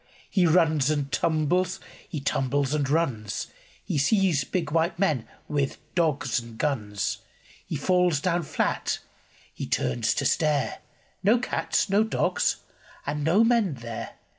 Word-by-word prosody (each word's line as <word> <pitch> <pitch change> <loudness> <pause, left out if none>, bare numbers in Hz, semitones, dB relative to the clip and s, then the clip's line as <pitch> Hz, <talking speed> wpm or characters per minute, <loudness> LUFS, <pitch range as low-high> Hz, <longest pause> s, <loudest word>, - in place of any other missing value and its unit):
He 180 -3 +3
runs 160 -4 +3
and 145 -2 -1
tumbles, 170 +4 +1 0.3
he 165 -4 -3
tumbles 140 0 0
and 145 -3 0
runs. 130 -10 0 0.4
He 145 - -1
sees 180 - +3
big 165 0 -2
white 165 +3 +1
men 155 - +1 0.2
with 140 -2 -1 0.2
dogs 145 -8 +1
and 115 -1 -11
guns. 105 -8 -1 0.5
He 160 - -3
falls 180 +1 +2
down 175 +2 +1
flat. 155 - -1 0.6
H)e - - -5
turns 65 -2 0
to - - -1
stare 150 -3 +1 0.2
— - - -37
No 215 +5 +5
cats, 245 - 0
no 200 +2 +3
dogs, 485 - +1 0.5
and 150 0 -2
no 175 +9 +4
men 230 - +2
there. 115 -2 -7
150 Hz, 140 wpm, -26 LUFS, 135-180 Hz, 0.6 s, No